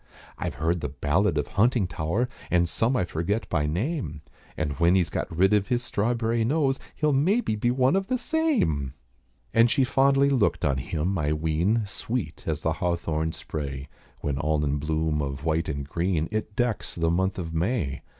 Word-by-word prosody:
I've - - -3
heard 85 +1 0
the 75 - -2
ballad 80 +6 +1
of 75 - -1
Huntingtower, 100 -2 +1 0.2
And 85 -1 +3
some 115 +9 +1
I 90 - +1
forget 85 +7 -2
by 75 -4 +1
name, 85 - -2 0.3
And 80 -2 -1
when 85 +2 +4
he's 90 -4 +2
got - - -2
rid 95 +5 +3
of 100 -2 +2
his 120 +1 0
strawberrie 115 +1 0
nose 135 +2 +1 0.2
He'll 150 -2 +1
maybe 170 - +2
be 115 +3 0
one 130 +5 +3
of 195 0 0
the 255 - +1
same!" 235 - 0 0.6
And 115 +1 +5
she 135 - +3
fondly 140 +1 +3
looked 125 -6 +2
on 65 -1 +1
him, 85 +6 -1
I 75 0 +1
ween, 80 +8 +1
Sweet 100 -4 -4
as - - -2
the - - +1
hawthorn 80 -2 -1
spray, 70 -2 -5 0.3
When 70 -2 -2
all 75 0 +1
in 70 0 0
bloom 80 0 0
of 70 0 -4
white 80 0 0
and 70 -2 -4
green, 85 0 0
It 110 -1 -3
decks 120 -2 -1
the 85 -1 +1
month 95 +3 0
of 80 -3 -4
May. 85 - -1
90 Hz, 180 wpm, -26 LUFS, 75-120 Hz, 0.6 s, And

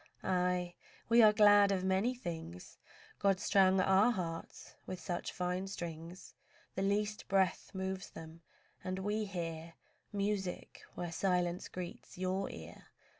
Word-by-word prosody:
Aye! 180 -1 0 0.4
we 235 +1 +7
are 215 -1 +8
glad 205 -1 +6
of 190 -2 0
many 190 +7 +1
things; 160 - -7 0.4
God 195 -2 +3
strung 190 -1 +4
our 190 +4 +5
hearts 170 -7 -4
with 185 - -5
such 175 +1 -3
fine 180 +1 -2
strings 170 -1 -7 0.4
The 190 - -3
least 205 +2 0
breath 190 -2 +1
moves 190 0 -3
them, 160 +1 -11 0.4
and 185 0 -3
we 210 +3 -1
hear 165 -3 -5 0.4
Music 200 -3 -2
where 175 -1 -4
silence 180 0 0
greets 180 -1 -8
your 185 +1 -1
ear. 80 -1 -10
185 Hz, 130 wpm, -34 LUFS, 175-200 Hz, 0.4 s, are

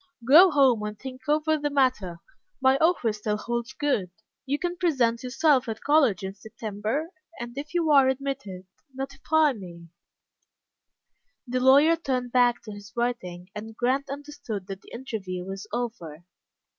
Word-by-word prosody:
"Go 335 +8 +9
home 270 -7 +4
and 210 0 -5
think 260 +4 -9
over 310 +1 +2
the 290 0 -1
matter. 255 -12 0 0.4
My 265 0 +4
offer 315 -8 +2
still 210 0 -2
holds 235 +3 -4
good. 265 -11 -1 0.4
You 280 +2 0
can 350 +2 -3
present 255 -10 +1
yourself 260 0 +2
at 220 - -6
college 275 - +3
in 190 0 -4
September, 220 - -4 0.3
and, 240 0 -7
if 295 +4 -7
you 330 -3 +2
are 275 -2 +6
admitted, 265 -9 -4 0.3
notify 285 +3 +1
me." 170 -6 -11 1.6
The 255 0 -1
lawyer 280 +6 +6
turned 255 -6 -2
back 245 -1 +3
to 215 - -8
his 205 0 -11
writing, 190 -7 -3
and 220 +1 -8
Grant 265 +3 0
understood 275 -8 -6
that 195 0 -8
the - - -17
interview 195 -8 -5
was 195 +2 -7
over. 210 -10 -5
245 Hz, 150 wpm, -26 LUFS, 210-280 Hz, 1.6 s, Go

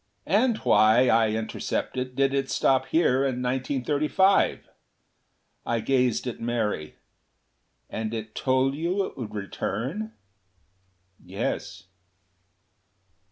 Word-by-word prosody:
"And 220 +6 +2
why," 115 - +4
I 115 -1 +4
intercepted, 125 +3 -3
"did 135 0 +2
it 135 -1 -1
stop 130 -1 +2
here 160 -6 +3
in 130 -2 0
1935?" 145 +8 +1 1.0
I 115 - -1
gazed 125 0 +1
at 125 - -5
Mary. 110 -9 -2 0.9
"And 110 0 -4
it 110 -1 -6
told 130 0 +1
you 175 +6 -1
it - - -9
would 115 -5 -7
return?" 130 - -4 1.1
"Yes." 95 - -4
130 Hz, 100 wpm, -26 LUFS, 115-140 Hz, 1.1 s, why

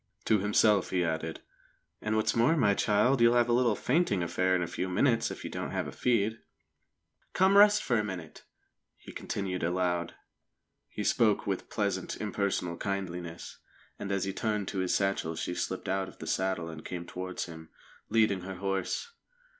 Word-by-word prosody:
To 110 -2 +3
himself 105 0 +3
he 90 -1 +1
added: 80 -1 -3 0.6
"And 110 0 -1
what's 110 - +1
more, 120 +8 +4
my 105 -8 +4
child, 105 +6 +2
you'll 115 +1 +6
have 120 0 +3
a - - +3
little 120 -3 +3
fainting 125 - +1
affair 95 +2 +1
in 90 - +1
a - - -1
few 95 - -3
minutes, 115 +5 +2
if - - -7
you - - -5
don't - - -4
have - - -2
a - - -6
feed." 115 -2 +1 0.9
"Come 190 +1 +4
and 200 - +7
rest 210 0 +6
for 120 -3 +1
a - - 0
minute," 90 -6 -7 0.5
he - - -12
continued 95 -2 -4
aloud. 90 0 -1 0.7
He - - -5
spoke 110 -3 +2
with 95 -2 -3
pleasant, 100 -3 -2
impersonal 100 -4 -1
kindliness, 90 -4 -5 0.4
and 100 - -4
as 100 -1 0
he 95 0 -2
turned 105 -2 -1
to 95 - -3
his 95 -1 +1
satchel 95 -4 0
she 90 - -3
slipped - - -3
out 95 0 0
of - - -13
the - - -8
saddle 95 0 -1
and 80 -1 -8
came 85 -1 -5
towards 90 +1 -5
him, 80 -2 -11 0.4
leading 110 -4 +3
her 95 +1 -6
horse. 95 - -2
100 Hz, 185 wpm, -30 LUFS, 90-110 Hz, 0.9 s, and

